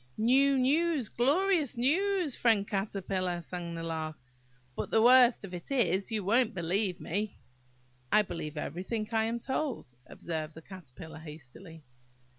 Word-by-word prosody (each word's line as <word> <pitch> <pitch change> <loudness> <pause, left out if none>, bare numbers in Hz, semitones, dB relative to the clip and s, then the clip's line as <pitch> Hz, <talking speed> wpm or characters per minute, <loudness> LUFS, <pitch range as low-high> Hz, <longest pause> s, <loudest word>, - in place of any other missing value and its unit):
"New, 270 +5 +4
news, 290 0 +1
glorious 305 +2 +1
news, 345 +4 +1
friend 220 -4 +2
Caterpillar!" 195 -3 -2
sang 170 0 -6
the 165 - -5
Lark; 160 -1 -4 0.6
"but - - -4
the 225 - +3
worst 245 -1 +6
of 185 - -11
it 175 -1 -7
is, 220 -7 +1
you 215 -2 -1
won't 235 +3 +2
believe 180 +2 -1
me!" 205 +4 -3 0.7
"I 215 - +5
believe 155 -5 -6
everything 190 +9 -3
I 220 -1 +2
am 230 +1 -1
told," 260 - -3
observed 160 -2 -5
the 160 - -10
Caterpillar 160 -4 -11
hastily. 160 +2 -12
210 Hz, 140 wpm, -30 LUFS, 170-255 Hz, 0.7 s, worst